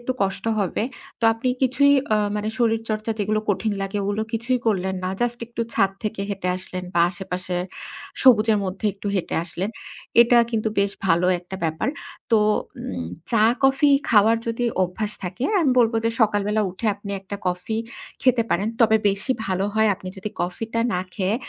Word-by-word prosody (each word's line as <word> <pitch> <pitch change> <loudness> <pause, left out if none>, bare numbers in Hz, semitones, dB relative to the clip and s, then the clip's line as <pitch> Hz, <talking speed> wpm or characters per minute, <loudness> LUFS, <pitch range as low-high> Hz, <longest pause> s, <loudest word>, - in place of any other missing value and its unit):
একটু 250 +2 -2
কষ্ট 195 +1 -2
হবে। 200 +1 0 0.4
তো - - -1
আপনি 225 +3 -2
কিছুই 265 +2 +4 0.2
আ - - +4 0.2
মানে 210 +1 -2
শরীরচর্চা 225 -1 0
যেগুলো 215 +1 0
কঠিন 205 +2 +1
লাগে 195 +1 -3
ওগুলো 205 +2 -1
কিছুই 235 +3 0
করলেন 190 -3 +1
না। 185 - 0
জাস্ট 240 0 0
একটু 235 0 -6
ছাদ 195 - +3
থেকে 215 -1 -3
হেঁটে 195 -3 -3
আসলেন 185 0 -6
বা 170 - +3
আশেপাশে 180 0 -4 0.7
সবুজের 220 -4 +6
মধ্যে 190 +3 -3
একটু 200 +2 -9
হেঁটে 190 - -2
আসলেন। 180 +5 -3 0.5
এটা 240 0 +4
কিন্তু 220 -1 0
বেশ 200 0 +3 0.2
ভালো 170 0 +3
একটা 180 +2 -8
ব্যাপার। 160 - -1 0.4
তো 225 - +7 0.4
উম 85 -3 -5 0.2
চা 230 -3 +3 0.2
কফি 270 +2 +4 0.2
খাওয়ার 220 +1 +5
যদি 230 +1 -1 0.2
অভ্যাস 205 +4 -2
থাকে, 185 +8 -4 0.2
আমি 285 -5 +3
বলব 230 -1 +3
যে 230 - +3
সকালবেলা 210 0 +2
উঠে 205 +5 -5
আপনি 200 0 -9
একটা 200 +1 -6
কফি 180 +5 -2 0.5
খেতে 255 -2 +4
পারেন। 200 +5 +1
তবে 220 -1 +6
বেশি 200 +6 0
ভালো 190 0 0
হয় 220 0 +4
আপনি 185 0 -9
যদি 195 +3 -4
কফি 180 +5 -2
টা 230 - +2
না 180 - 0
খেয়ে 195 +1 0
210 Hz, 175 wpm, -23 LUFS, 190-230 Hz, 0.7 s, তো